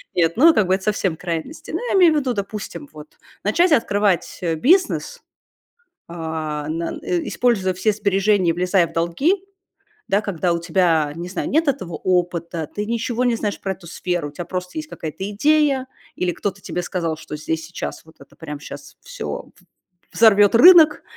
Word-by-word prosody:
Нет, 165 -2 +2
ну, 320 +6 +7
э, - - -4
как 205 -4 +2
бы, 185 - +3
эт 190 - -6
совсем 195 -5 0
крайности. 170 - -5
Ну, - - -2
я - - +1
имею 350 -4 +6
в 305 - +1
виду, 260 -3 -1
допустим, 200 -7 -6
вот, 150 0 -11 0.4
начать 335 - +2
открывать, 205 - +1
э, 165 -2 -1
бизнес, 350 - +1 0.9
а, 160 -3 -4
на 165 +1 -3
э, 175 -1 -2
используя 210 -7 +1
все 200 +4 +1
сбережения 200 -2 +2
и - - +3
влезая 180 0 +2
в 165 - -14
долги, 170 - +1 0.8
да, 200 +2 +2
когда 180 -3 -1
у 170 - -1
тебя, 165 -4 +1
не 175 +2 -6
знаю, 185 - -3
нет 315 +1 +1
этого 215 -12 -2
опыта, 170 -3 -1
ты 210 - -2
ничего 235 +2 -2
не 240 -1 +2
знаешь 210 -2 -3
про 195 - -3
эту 170 -2 -15
сферу, 175 -3 -3
у - - -14
тебя 170 +3 -7
просто 180 +6 -5
есть 310 0 -4
какая-то 165 +5 -6
идея 280 +2 +2 0.3
или 180 -1 -1
кто-то 195 +1 -4
тебе 180 - -4
сказал, 165 -3 -3
что 150 - -8
здесь 160 +1 -3
и - - -11
сейчас 175 - -6
вот 160 - -19
это, - - -17
прям, 150 -3 -8
щас - - -11
всё, - - -7
в 180 -1 -29
взорвет 205 -1 +6
рынок, 320 +2 +7
185 Hz, 190 wpm, -21 LUFS, 170-230 Hz, 0.9 s, ну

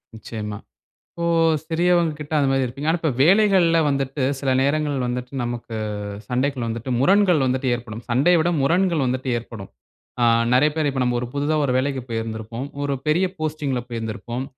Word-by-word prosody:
நிச்சயமா. 105 -1 -6 0.6
இப்போ 170 - -3 0.4
சிறியவங்ககிட்ட 165 -2 0
அந்த 140 -2 +2
மாரி 135 0 +2
இருப்பீங்க. 135 +5 -5
ஆனா, 170 - 0
இப்ப 160 - +1
வேலைகள்ல 185 -2 +4
வந்துட்டு, 135 -1 -1 0.2
சில 135 -1 0
நேரங்கள் 145 +1 +1
வந்துட்டு 125 +1 -4
நமக்கு 120 -1 -5 0.5
சண்டைக்குள்ள 130 0 -1
வந்துட்டு 115 +3 -4
முரண்கள் 180 0 +4
வந்துட்டு 130 +1 0
ஏற்படும். 115 -2 -8
சண்டைய 145 +9 +4
விட 165 +2 +2
முரண்கள் 170 +1 +2
வந்துட்டு 130 +1 -2
ஏற்படும். 110 -4 -10 0.5
அ - - +4 0.3
நிறைய 140 +4 +5
பேரு 155 -2 +1
இப்ப 135 -1 -2
நம்ம 125 0 0
1 125 - -4
புதுசா 145 +2 0
1 130 - 0
வேலைக்கு 135 0 -1
போயிருந்திருப்போம். 115 +2 -4 0.2
1 140 -1 -1
பெரிய 170 +5 +3
போஸ்டிங் 155 -3 -2
ல - - -2
போயிருந்திருப்போம். 120 +2 -4
135 Hz, 160 wpm, -22 LUFS, 120-155 Hz, 0.6 s, நிறைய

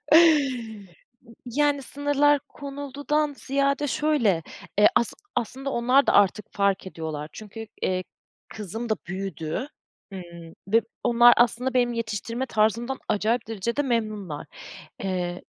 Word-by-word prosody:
Imm, 260 - +3 0.6
yani, 285 +3 +1
sınırlar 290 +1 +2
konuldudan 285 +1 -2
ziyade 280 +1 0
şöyle 255 - +1 0.4
e, 210 - +8
asıl 235 - +1 0.2
aslında 265 +4 -3
onlar 250 +3 +3
da - - +4
artık 205 +1 +3
fark 200 -1 +1
ediyorlar. 155 -4 -5
Çünkü, 220 +1 -9 0.2
eee, 185 0 0 0.5
kızım 220 +3 -4
da 220 - +2
büyüdü, 190 - -4 0.4
hımm, 170 -3 -9
ve 225 +3 +5 0.2
onlar 240 0 +7
aslında 245 +2 +2
benim 245 -1 +3
yetiştirme 230 +2 -3
tarzımdan 230 +3 +1
acayip 220 +3 +1
derecede 230 +5 -1
memnunlar. 215 - -2 0.6
Eee, 180 -2 -2
235 Hz, 115 wpm, -25 LUFS, 200-275 Hz, 0.6 s, e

